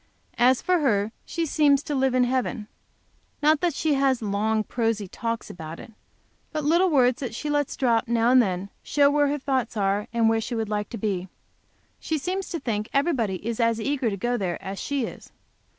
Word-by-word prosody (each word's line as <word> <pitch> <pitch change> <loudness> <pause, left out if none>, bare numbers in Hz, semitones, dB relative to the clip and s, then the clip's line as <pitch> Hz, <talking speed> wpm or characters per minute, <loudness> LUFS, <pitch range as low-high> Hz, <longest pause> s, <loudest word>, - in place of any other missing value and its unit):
As 250 +1 +4
for 365 -1 +2
her, 215 -7 +1
she 335 0 -2
seems 290 -2 +3
to 295 - -4
live 265 -2 +1
in 255 - +4
heaven. 245 -3 -1 0.8
Not 305 0 +4
that 345 -5 +1
she 310 +1 +1
has 270 -2 +2
long 215 +2 0
prosy 225 -3 -1
talks 230 +4 -4
about 160 -1 -8
it, 225 - -12 0.6
but 305 -1 -3
little 340 +5 +3
words 255 -5 +3
that 245 -5 -5
she 295 +4 -3
lets 290 -2 -1
drop 235 -4 +2
now 235 +1 +2
and 255 0 +7
then 190 -2 -2
show 285 -1 +3
where 290 0 +3
her 290 +1 0
thoughts 265 -4 -2
are, 200 +1 0
and 230 -1 +2
where 225 0 +2
she 235 +2 -4
would 220 -2 -2
like 210 -1 -2
to 235 - -6
be. 190 -3 -2 0.7
She 320 - -2
seems 370 +5 -3
to 335 - -3
think 215 -5 -3
everybody 240 - 0
is 230 0 -3
as 230 -1 +2
eager 260 0 0
to 200 - -4
go 240 +5 -1
there 180 -5 -2
as 195 0 -6
she 280 -4 -1
is. - - -10
240 Hz, 205 wpm, -25 LUFS, 215-285 Hz, 0.8 s, and